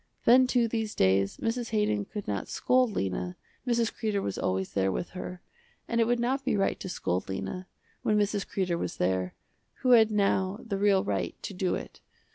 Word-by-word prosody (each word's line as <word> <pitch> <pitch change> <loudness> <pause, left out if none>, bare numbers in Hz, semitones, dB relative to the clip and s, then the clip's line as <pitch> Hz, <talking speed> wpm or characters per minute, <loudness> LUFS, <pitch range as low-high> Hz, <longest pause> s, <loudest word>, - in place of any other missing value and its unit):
Then 255 +2 +7
too 245 -2 +2
these 220 -1 -2
days 95 +1 +2
Mrs. 230 +1 -2
Haydon 210 - +1
could 210 -2 -7
not 100 -2 -2
scold 255 -1 +2
Lena, 90 - -2 0.3
Mrs. 235 -2 +1
Kreder 215 -3 -1
was 100 - -3
always 95 0 -1
there 95 -1 +1
with 175 - -3
her, 180 -1 -7 0.4
and 235 0 +1
it 225 - +3
would 240 0 +2
not 260 +3 0
be 210 - +1
right 195 - +1
to 185 - -6
scold 90 - -2
Lena, 95 - -4 0.3
when 210 - +2
Mrs. 205 -1 0
Kreder 180 -3 -1
was 90 - -4
there, 90 0 0 0.5
who 255 - +3
had 225 -3 +7
now 200 -1 +1
the 200 -4 -2
real 200 -2 +4
right 100 -2 -2
to - - -5
do 185 -1 0
it. - - -8
200 Hz, 195 wpm, -28 LUFS, -, 0.5 s, Then